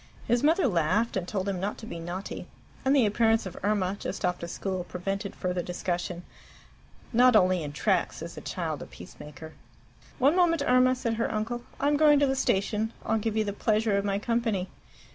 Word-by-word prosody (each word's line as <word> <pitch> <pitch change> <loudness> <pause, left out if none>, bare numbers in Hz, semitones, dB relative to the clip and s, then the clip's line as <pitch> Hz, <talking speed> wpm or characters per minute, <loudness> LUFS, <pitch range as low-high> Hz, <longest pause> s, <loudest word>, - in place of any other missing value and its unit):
His 240 +1 +2
mother 320 +2 +3
laughed, 185 +4 +1
and 185 -2 -2
told 195 -1 -2
him 195 -2 -1
not 200 +3 -3
to 220 - -9
be 170 - -6
naughty; 175 +4 -6 0.4
and 270 +1 +3
the 260 -5 +5
appearance 225 +1 +2
of 185 - -7
Irma, 200 -2 0
just 195 - -3
off 180 0 0
to 170 - -5
school, 185 +1 -3
prevented 195 +3 -4
further 180 -1 -2
discussion. 175 0 -3 0.9
Not 250 +1 +6
only 185 -3 +4
in 145 -2 -5
Tracts 145 - 0
is - - -7
a - - -8
child - - -4
a - - -7
peacemaker. 150 +2 -11 0.6
"One 280 +5 +4
moment, 335 -4 +3
Irma," 255 +1 +4
said 235 -2 -2
her 230 - 0
uncle. 225 +3 -2 0.2
"I'm 290 +1 +2
going 300 -1 +6
to 285 - +4
the 270 -1 +1
station. 220 -2 0
I'll 225 0 +1
give 220 0 -2
you 220 - +3
the 200 -1 -3
pleasure 215 0 +1
of 200 - +1
my 200 -1 0
company." 220 -4 -1
210 Hz, 200 wpm, -28 LUFS, 185-240 Hz, 0.9 s, Not